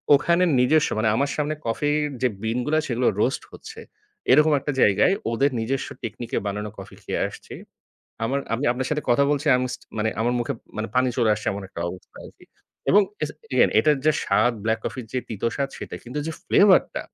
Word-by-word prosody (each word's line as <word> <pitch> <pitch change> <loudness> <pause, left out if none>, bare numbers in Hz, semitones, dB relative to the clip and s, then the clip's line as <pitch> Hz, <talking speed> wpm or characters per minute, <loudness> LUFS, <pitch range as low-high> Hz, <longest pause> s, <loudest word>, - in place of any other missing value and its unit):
ওখানে 170 +5 +2 0.2
নিজস্ব 150 +5 +3
মানে 110 0 +2
আমার 140 +3 +1
সামনে 150 +1 -1
কফির 145 +6 0 0.2
যে, 125 - +4 0.2
বিনগুলো, 125 +7 0
সেগুলো 120 0 0
রোস্ট 135 - 0
হচ্ছে। 445 +1 -11 0.5
এরকম 150 +3 +6
একটা 145 +2 -3
জায়গায় 105 - +4 0.2
ওদের 135 +4 +2
নিজস্ব 130 +4 -2 0.2
টেকনিকে 115 +1 -4
বানানো 105 +1 -3
কফি 95 - -10
খেয়ে - - -2
আসছি। - - -11 0.7
আমার 135 +5 0
আমি 125 +5 -2
আপনার 130 +1 -3
সাথে 150 0 -1
কথা 120 +4 +4
বলছি 145 +1 -1
আম 125 - 0
স্টি - - -10
মানে 110 +1 +1
আমার 120 +2 +1
মুখে 120 - -2 0.4
পানি 125 0 +3
চলে 115 -3 +3
আসছে 105 - -5
এমন 100 0 -6
একটা 85 - -7
অবস্থা 90 - -12
আরকি। - - -16 0.4
এবং 205 +2 +7 0.5
এগেইন - - +5
এটার 150 -2 +3
যে, 155 - +6
স্বাদ 110 +5 +3
ব্ল্যাক 110 0 0
কফি 130 - -4
যে, 130 - -2
তিত 110 -2 -7
স্বাদ 140 -1 -1
সেটা - - -7
কিন্তু 125 +5 -5
যে, - - -2
ফ্লেভার 200 -1 +6
টা - - -3
130 Hz, 190 wpm, -24 LUFS, 115-150 Hz, 0.7 s, এবং